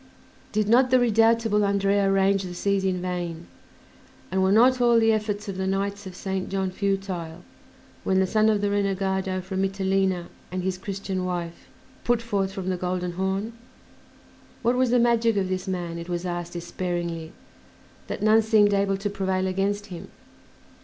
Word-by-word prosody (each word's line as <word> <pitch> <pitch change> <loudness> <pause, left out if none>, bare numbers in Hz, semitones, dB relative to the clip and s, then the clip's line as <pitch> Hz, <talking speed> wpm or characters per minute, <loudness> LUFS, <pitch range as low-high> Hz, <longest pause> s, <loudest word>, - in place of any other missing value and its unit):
Did 215 -1 0
not 250 +4 +5
the 255 0 +5
redoubtable 225 -2 +3
Andrea 200 0 +2
range 195 0 +3
the 180 -2 -6
seas 200 +1 0
in 185 -2 -1
vain, 175 -2 -4 0.9
and 190 0 +1
were 190 0 +3
not 250 +4 +5
all 235 -1 +5
the 225 0 +4
efforts 210 -1 -2
of 195 -2 -5
the 190 0 -1
Knights 200 +1 -2
of 185 - -9
Saint 190 0 -3
John 190 -1 -1
futile, 185 -4 -3 0.6
when 190 0 +2
the 190 - +3
son 215 +3 +3
of 210 -2 +2
the 205 0 0
renegado 190 -1 -1
from 190 +1 -3
Mitylene 190 -2 0 0.3
and 185 0 -3
his 185 0 -2
Christian 190 -1 -4
wife 175 -2 -4 0.4
put 240 -1 +1
forth 200 -4 -1
from 190 -1 -4
the 185 - -1
Golden 180 0 -2
Horn? 190 +5 -2 1.1
What 240 +2 +2
was 255 0 +2
the 245 - +3
magic 235 -2 +3
of 190 -2 0
this 185 0 -3
man, 175 -3 -3
it 170 +1 -8
was 175 0 -3
asked 175 -1 -4
despairingly, 170 -1 -4 0.8
that 205 - -4
none 215 +1 +5
seemed 215 -2 +4
able 195 -1 +1
to 195 +2 -3
prevail 190 -2 -1
against 195 +2 -1
him? 170 - -8
195 Hz, 175 wpm, -25 LUFS, 185-205 Hz, 1.1 s, not